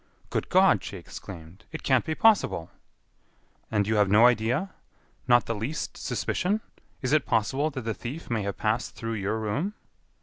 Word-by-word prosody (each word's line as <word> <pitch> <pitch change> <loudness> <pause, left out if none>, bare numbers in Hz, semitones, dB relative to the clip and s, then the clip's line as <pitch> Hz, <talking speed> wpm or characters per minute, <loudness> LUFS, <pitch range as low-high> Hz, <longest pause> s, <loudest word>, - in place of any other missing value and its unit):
"Good - - -2
God!" - - +5
she - - -6
exclaimed, 90 +2 -11
"it 160 - -7
can't 130 -3 +3
be 155 - -2
possible!" 210 - +3 1.0
"And 105 -2 +1
you 110 +1 +1
have 105 -2 +4
no 105 +4 +6
idea? 125 - +2 0.6
Not 120 -1 +5
the 115 - -1
least 115 +9 -4
suspicion? 205 +4 -1 0.4
Is 130 - 0
it 155 -3 +3
possible 130 +7 +1
that 135 -3 -5
the 115 -1 -2
thief 135 +10 -7
may 115 -3 -1
have 100 -1 -3
passed 110 +3 -1
through 115 0 -4
your 105 0 -1
room?" 135 - -2
115 Hz, 170 wpm, -27 LUFS, 105-145 Hz, 1.0 s, no